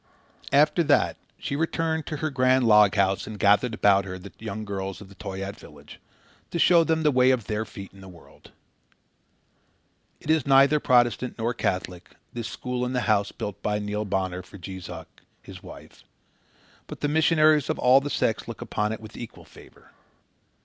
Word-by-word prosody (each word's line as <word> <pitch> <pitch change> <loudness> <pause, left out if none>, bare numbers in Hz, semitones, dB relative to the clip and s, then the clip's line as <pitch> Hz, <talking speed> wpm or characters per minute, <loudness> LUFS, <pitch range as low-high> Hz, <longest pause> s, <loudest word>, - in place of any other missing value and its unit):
After 150 +4 +4
that 145 -1 +2 0.2
she 140 - -4
returned 160 0 -1
to 155 - -4
her 155 - -1
grand 130 -1 +3
log 105 -2 +6
house 95 -1 +1
and 110 -1 -7
gathered 105 +4 +3
about 100 -2 +3
her 95 -1 -6
the 95 +2 -12
young 110 -1 -6
girls 95 -2 -5
of 100 -2 -13
the 100 - -15
Toyaat 95 +1 -6
village, 75 0 -15 0.5
to - - -4
show 170 0 +5
them 160 0 0
the 150 - +4
way 130 -1 +4
of 125 -5 +1
their 105 +2 -2
feet 100 -2 -11
in 100 - -15
the 95 - -12
world. 85 -3 -17 1.7
It 155 - -2
is 160 -4 +1
neither 140 +2 +5
Protestant 125 -1 +2
nor 115 +1 -1
Catholic, 90 -5 -4 0.2
this 120 -1 -5
school 125 -1 -4
in 125 +1 -2
the 125 - 0
house 100 -3 +1
built 105 -2 -7
by 105 0 -1
Neil 105 0 -3
Bonner 95 -2 -2
for 95 +2 -14
Jees 95 -1 -8
Uck, 80 -2 -11 0.2
his - - -11
wife; - - -13 0.8
but - - -9
the 145 - +1
missionaries 155 -1 +3
of - - -1
all 130 +2 +5
the 145 - -4
sects - - -1
look - - -7
upon 105 0 -2
it 110 - -6
with 110 0 -12
equal 120 - -10
favour. - - -18
110 Hz, 185 wpm, -25 LUFS, 100-135 Hz, 1.7 s, log